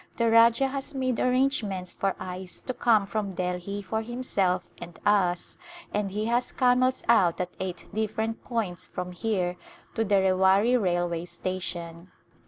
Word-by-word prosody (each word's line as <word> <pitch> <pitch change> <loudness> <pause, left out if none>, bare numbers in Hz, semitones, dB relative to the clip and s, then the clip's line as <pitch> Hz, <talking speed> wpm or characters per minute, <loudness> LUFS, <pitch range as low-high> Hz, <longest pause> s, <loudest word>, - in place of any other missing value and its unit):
The 230 -1 +2
Rajah 235 +3 +5
has 275 +1 -5
made 255 -3 0
arrangements 250 -8 0
for 195 -1 -1
ice 185 0 -6
to 255 - -4
come 225 -4 +3
from 200 -2 -3
Delhi 180 +3 -3
for 220 +3 -2
himself 210 -6 0 0.2
and 175 -1 -9
us 185 -4 +1 0.3
and 205 -1 0
he 210 +3 -2
has 240 +2 0
camels 255 0 +2
out 195 -8 +4
at 180 0 -2
eight 185 -2 -4
different 220 +1 -2
points 190 -7 -3
from 180 0 -5
here 180 -2 -1 0.4
to 225 - 0
the 205 -2 +2
Rewari 190 +4 +4
railway 175 -5 0
station. 175 -1 -5
200 Hz, 150 wpm, -27 LUFS, 180-230 Hz, 0.4 s, Rajah